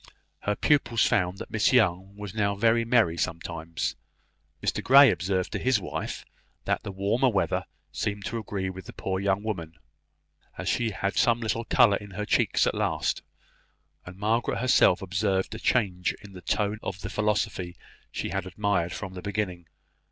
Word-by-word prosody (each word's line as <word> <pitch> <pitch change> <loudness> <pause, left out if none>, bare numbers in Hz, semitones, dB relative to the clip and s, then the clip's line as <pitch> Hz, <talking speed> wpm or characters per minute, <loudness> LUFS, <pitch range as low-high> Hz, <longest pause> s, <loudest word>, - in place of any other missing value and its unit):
Her 105 - -1
pupils 120 -3 +2
found 90 +1 +1
that - - -8
Miss 110 - +2
Young 95 -5 +2
was 105 -2 -7
now 100 -2 0
very 115 +3 +3
merry 115 -8 +3
sometimes. 85 -1 -3 0.6
Mr - - -1
Grey 135 -1 +8
observed 95 -1 -1
to - - -2
his 130 -4 +2
wife - - -5 0.4
that - - 0
the - - -6
warmer 100 +7 +1
weather 95 -7 0 0.3
seemed 100 -1 -3
to 115 - -3
agree 100 -3 -3
with 95 0 -7
the - - -9
poor 95 -1 -2
young 100 +1 0
woman, 85 -7 -4 0.8
as - - -5
she 120 -1 +1
had 100 -1 -3
some 120 0 +4
little 115 0 -2
colour 100 -4 +5
in 105 - -11
her 105 - -2
cheeks - - +2
at - - +1
last; - - -1 0.8
and 90 +1 -11
Margaret 110 +4 0
herself 120 -7 +4
observed 95 0 0
a - - -6
change 95 -7 +1
in 100 -1 -12
the 90 - -10
tone 105 +3 -1
of 95 -1 -5
the - - -5
philosophy 105 -4 -1 0.4
she - - -3
had 95 - -3
admired 95 -2 0
from 95 -3 -6
the 90 - -7
beginning. 95 -4 -3
100 Hz, 175 wpm, -27 LUFS, 95-110 Hz, 0.8 s, Grey